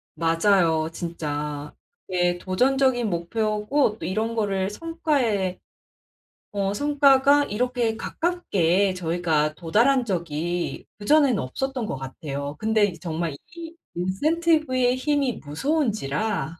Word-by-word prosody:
맞아요 165 -1 +2
진짜. 150 -4 -4 0.3
그게 175 -1 +1
도전적인 245 +5 +1
목표고 215 +7 0
또 - - -7
이런 220 +4 -1
거를 195 -3 0
성과에 245 - -1 0.9
어 200 -1 -1
성과가 285 +1 +4
이렇게 240 -1 -1
가깝게 200 - 0
저희가 165 -3 0
도달한 235 - +2
적이 175 -3 -3
그전에는 275 0 +4
없었던 255 - -3
것 135 - -3
같아요. 140 +2 -6
근데 220 -1 +3
이제 175 -5 -2
정말 165 -3 -3 0.2
이 335 0 -8 0.2
인센티브의 255 - +1
힘이 275 -3 0
무서운지라 205 - -1
205 Hz, 255 characters per minute, -24 LUFS, 170-265 Hz, 0.9 s, 성과가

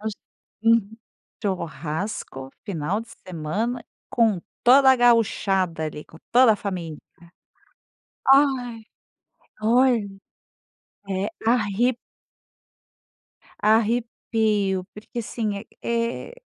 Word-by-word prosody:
Gauch 215 0 -3 0.5
Uhum. 225 -2 +3 0.5
Churrasco, 165 - -4
final 185 +1 -2
de 230 - -11 0.2
semana 195 +9 -3 0.3
com 220 -6 +2 0.2
toda 265 +2 +7
a - - +3
gauchada 195 -8 +2
ali, 150 -1 -6
com 160 - -16
toda 245 -1 +7
a - - -1
família. 175 -7 -5 1.3
Ai, 260 -5 +2 0.8
olha, 235 -1 +3 1.0
é 195 +1 -1 0.2
arre 230 +1 +2 1.6
Arrepio, 220 -3 +1
porque 215 +3 -9
assim, 215 -3 -3 0.2
é 235 - -2
é - - -12
215 Hz, 85 wpm, -24 LUFS, 190-235 Hz, 1.6 s, toda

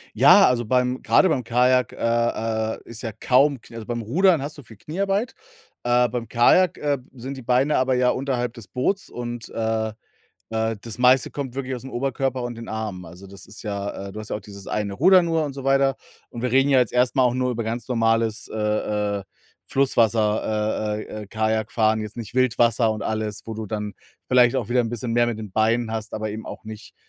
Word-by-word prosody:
Ja, - - +7
also, 120 -1 0
beim 125 +2 0
grade 190 - +4
beim 140 -7 0
Kajak, 125 +1 +2
äh, - - -12 0.8
äh, - - -15
ist 115 -1 -10
ja 115 - -4
kaum 130 +5 +2
k 115 - -16
also, 115 -2 -7
beim 120 -1 -3
Rudern 165 - +3
hast 145 +2 -5
du - - -9
viel 110 -2 -15
Kniearbeit. 195 - -2 0.5
Äh, 120 0 +3
beim 120 0 -4
Kajak, 145 +10 +4
äh, 145 -1 0
sind 130 +2 -7
die 130 - -9
Beine 125 +5 +2
aber 130 0 +2
ja 125 0 +3
unterhalb 125 -3 -2
des 115 -5 -10
Boots 190 +10 -1
und, 120 -1 -6
äh, 110 -1 -1 0.6
äh, 110 0 -1
das 115 +1 -7
meiste 125 +1 +4
kommt 135 -4 -5
wirklich 135 -1 -3
ausm 130 +2 -8
Oberkörper 135 0 -2
und 120 0 -4
den 115 - -9
Armen. 110 -4 -4
Also, 90 +3 -12
das 95 0 -11
ist 105 - -10
ja 100 -2 -4
äh, - - -9
du 110 - -7
hast 110 - -8
ja - - -1
auch - - -8
dieses 100 -1 -11
eine 105 -2 -2
Ruder 185 - +6
nur 165 -2 0
und 145 - -4
so 135 -1 -7
weiter. 135 0 +3 0.3
Und 120 - -7
wir 125 - 0
reden 135 +2 +4
ja 135 - +5
jetzt 125 - 0
erst 125 0 +2
mal 130 - +5
auch 125 -1 +2
nur 130 0 0
über 115 -1 -3
ganz 115 +1 -4
normales, 115 -2 +1
äh, - - -7
äh, 105 -1 -1 0.5
Flusswasser 110 -4 +1
äh, - - -5
äh, 110 0 -7
äh, - - -15
Kajakfahren, 110 +1 0
jetzt 105 -1 -7
nicht 120 0 -7
Wildwasser 120 -2 +3
und 110 -1 -3
alles, 110 -2 -2
wo 115 - -5
du 110 0 -5
dann 105 0 -4 0.3
vielleicht 125 -1 +4
auch - - -2
wieder 125 +1 +3
'n 115 - -3
bisschen 120 0 -3
mehr 120 0 +3
mit 115 -2 -3
den 105 -3 -8
Beinen 110 +2 +1
hast, 110 -1 -4
aber 110 0 -3
eben 110 +1 -7
auch - - -9
nicht 110 0 -10
120 Hz, 220 wpm, -23 LUFS, 110-130 Hz, 0.8 s, Ja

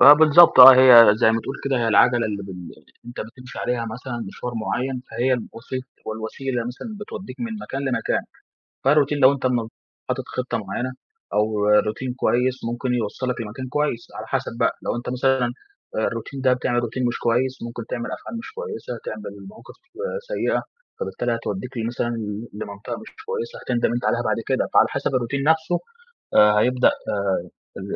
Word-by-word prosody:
فبالضبط 150 0 +8
آه، 130 +1 +13
هي 130 -1 +8 0.3
زَي 110 - +6
ما 115 - 0
تقول 135 - -6
كده 135 -1 +1
هي 115 - +1
العجَلة 120 +1 +4
اللي 100 -2 -4
بل 90 -3 -9 0.3
أنت 120 - -7
بتمشي 125 +3 -9
عليها 120 -1 -1
مثلًا 120 -1 -6
مشوار 125 +4 -6
معيّن، 130 +1 -2
فهي 130 +2 +1
الوسيط 125 +1 -5 0.2
والوسيلة 120 +4 -4
مثلًا، 135 - -8
بتودّيك 205 -1 -8
من 230 -1 -3
مكان 135 - -5
لمكان. 125 -3 0 0.6
فالروتين 145 +1 +3
لو 130 0 +7
أنت 135 -2 -2
م 120 -3 0 0.4
حاطط - - -2
خطّة - - -2
معيّنة 130 +1 -3 0.4
أو 105 -1 +1 0.2
روتين 125 +4 -3
كويس 130 0 +1
ممكن 125 +1 -2
يوصّلك 125 +2 -2
لمكان 115 +4 -6
كويس 145 -4 -1
على - - -6
حَسب - - -2
بقى، - - +2
لو - - -1
أنت 120 - -6
مثلًا، 130 -1 +1 0.5
آآ، - - -1
الروتين 135 -1 -6
ده 130 -1 +3
بتعمل 125 -1 0
روتين 125 +3 -4
مش 120 - -2
كويس، 125 +2 0
ممكن 115 0 -6
تعمل 120 -1 -4
أفعال 230 - -8
مش 230 - -9
كويسة، 460 - -6
تعمل 105 -2 -6 0.2
مواقف 115 - -15 0.5
سيئة، - - 0 0.4
فبالتالي 120 - -2
هتودّيك 115 +1 -4 0.2
مثلًا 120 0 -2
ل 105 +1 -5
لمنطقة 105 -1 -6
مش 225 - -11 0.2
كويسة 470 +1 -4
هتندَم 120 -1 0
أنت 120 +1 -2
عليها - - +1
بعد - - +1
كده. - - +1
فعلى - - +6
حَسب - - -2
الروتين 130 +3 -1
نفْسه، 160 +3 +2 0.6
آآ، 105 0 +6
هيبدأ 125 +2 +3
آآ 95 -3 -1 0.3
ال 95 0 -5
125 Hz, 170 wpm, -22 LUFS, 115-135 Hz, 0.6 s, آه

